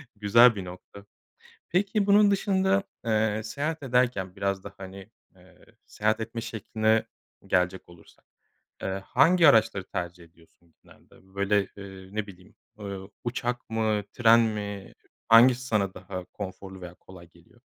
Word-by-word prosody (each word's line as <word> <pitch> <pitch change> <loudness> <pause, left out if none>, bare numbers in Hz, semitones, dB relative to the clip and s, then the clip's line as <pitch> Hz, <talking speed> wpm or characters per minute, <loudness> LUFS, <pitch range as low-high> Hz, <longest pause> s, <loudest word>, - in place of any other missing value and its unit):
güzel 110 +3 +5
bir 95 -2 -6
nokta. 90 +3 -12 0.6
Peki, 200 +3 +1
bunun 205 0 +5
dışında, 195 0 +1 0.2
eee, 110 -1 +1
seyahat 145 +7 -4
ederken 125 -8 0
biraz 100 -1 -2
da, 100 - -9
hani, 95 0 -10 0.3
eee, 90 0 -21 0.2
seyahat 110 +1 -1
etme 115 +1 -5
şekline 110 0 0 0.4
gelecek 90 -1 0
olursak, 85 -1 -19 0.6
eee, 95 0 -3
hangi 170 -1 +4
araçları 110 -7 +4
tercih 85 0 -6
ediyorsun 85 0 -24
genelde? 95 +1 -22
Böyle, 100 0 +1
ııı, 95 0 -11
ne 110 -1 -2
bileyim, 90 -1 -15 0.2
eee, 100 -2 -6 0.3
uçak 120 0 -3
mı, 110 -2 0
tren 115 -1 +5
mi 105 -3 -4 0.4
hangisi 120 +2 +7
sana 100 -6 0
daha 95 -1 -8
konforlu 95 0 -9
veya 90 -1 -9
kolay 90 -2 -15
geliyor? 85 +9 -24
105 Hz, 135 wpm, -26 LUFS, 95-115 Hz, 0.6 s, hangisi